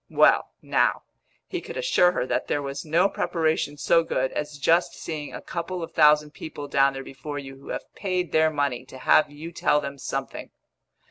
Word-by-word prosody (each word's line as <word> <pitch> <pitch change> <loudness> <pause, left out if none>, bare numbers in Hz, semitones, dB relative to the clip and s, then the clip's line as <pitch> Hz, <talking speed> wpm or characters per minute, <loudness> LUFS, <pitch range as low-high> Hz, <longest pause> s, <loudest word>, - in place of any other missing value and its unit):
Well, - - +4
now, - - +1 0.4
he - - -4
could - - -8
assure 485 - +3
her 125 - -1
that - - -1
there 145 - -1
was 140 0 -5
no 165 +5 +3
preparation 160 -6 -1
so 165 +3 +3
good 130 -4 -1
as 150 0 -4
just 165 +6 +2
seeing 155 -3 -6
a - - -8
couple 175 0 -4
of 165 - -7
thousand 150 -1 +5
people 145 -2 -7
down 140 -1 +3
there 135 0 -6
before 145 +2 -7
you 135 -1 -8
who 135 - -14
have - - -6
paid 180 -3 -2
their 160 0 +4
money 140 -5 -1
to 130 - -12
have 145 +3 +4
you 150 +3 -9
tell 150 -3 +2
them 140 -1 -6
something. 135 +1 -5
150 Hz, 195 wpm, -25 LUFS, 140-165 Hz, 0.4 s, thousand